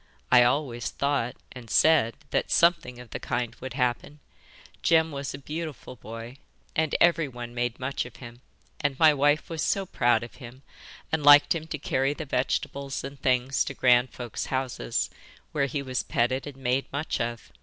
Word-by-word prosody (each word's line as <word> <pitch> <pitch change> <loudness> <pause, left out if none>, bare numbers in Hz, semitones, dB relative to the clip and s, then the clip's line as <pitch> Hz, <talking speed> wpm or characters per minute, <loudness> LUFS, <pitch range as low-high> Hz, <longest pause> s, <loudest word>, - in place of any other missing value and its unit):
I 125 -1 +8
always 120 -2 +1
thought 140 -4 -1 0.2
and 120 -3 -11
said 155 -8 +4 0.2
that - - 0
something 170 -8 +2
of 125 -2 -12
the - - -4
kind 120 -2 -2
would 130 -2 -6
happen. 125 +2 -1 0.6
Jem 160 -1 +3
was 140 -1 -4
a - - -7
beautiful 155 -1 -6
boy, 115 +3 -9 0.4
and 160 -2 +1
everyone 135 -9 +1
made 120 -1 -2
much 130 +2 -2
of 120 - -11
him, 120 -1 -11 0.4
and 145 -3 -1
my 155 0 +6
wife 145 +2 +2
was 165 -2 -4
so 195 -1 0
proud 120 -8 +2
of 120 - -10
him, 125 +2 -11 0.5
and 160 -2 0
liked 145 0 +8
him 160 -1 -5
to 155 - -4
carry 135 0 0
the 155 - -6
vegetables 135 +1 -2
and 140 0 -8
things 130 0 +2
to 140 - -6
grand 125 0 +4
folks' 120 -2 -6
houses, 130 - -2 0.4
where 140 -2 +1
he 140 +1 -3
was 130 -1 -2
petted 130 +4 0
and 140 -2 -9
made 130 0 0
much 145 +3 -2
of. 115 0 -4
135 Hz, 175 wpm, -27 LUFS, 120-145 Hz, 0.6 s, I